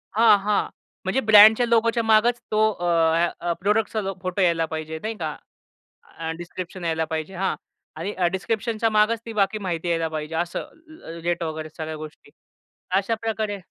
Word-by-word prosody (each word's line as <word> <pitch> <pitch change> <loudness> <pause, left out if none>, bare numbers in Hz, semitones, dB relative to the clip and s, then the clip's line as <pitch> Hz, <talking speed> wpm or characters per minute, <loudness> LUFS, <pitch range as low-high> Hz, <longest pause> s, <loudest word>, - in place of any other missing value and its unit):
हां. 225 -1 +6
हां. 205 +1 0 0.4
म्हणजे 190 +8 +1
ब्रँडच्या 220 +2 +7
लोगोच्या 230 0 +2
मागच 225 +2 +3
तो 215 - +1
अ, 175 -4 -6 0.5
अ, 170 0 -1
प्रॉडक्टचा 215 +2 +1 0.2
फोटो 185 +2 -2
यायला 170 -2 +3
पाहिजे, 160 0 -5
नाही 220 +1 -2
का? - - -4 0.8
अ, 165 0 -3
डिस्क्रिप्शन 175 +1 -7
यायला 160 -1 0
पाहिजे. 160 +3 -4
हां. 190 +1 -1 0.4
आणि 205 - -4 0.2
डिस्क्रिप्शनच्या 225 +3 -1
मागच 215 +1 +2
ती 230 - -5
बाकी 205 0 +1
माहिती 175 -4 -3
यायला 165 -1 0
पाहिजे 155 0 -5
असं. 170 +1 -2
अ, 315 - -12
रेट 175 0 -1
वगैरे 155 -1 -4
सगळ्या 155 -1 -5
गोष्टी 155 -1 -11 0.7
अशाप्रकारे 220 0 -2
195 Hz, 155 wpm, -24 LUFS, 165-220 Hz, 0.8 s, ब्रँडच्या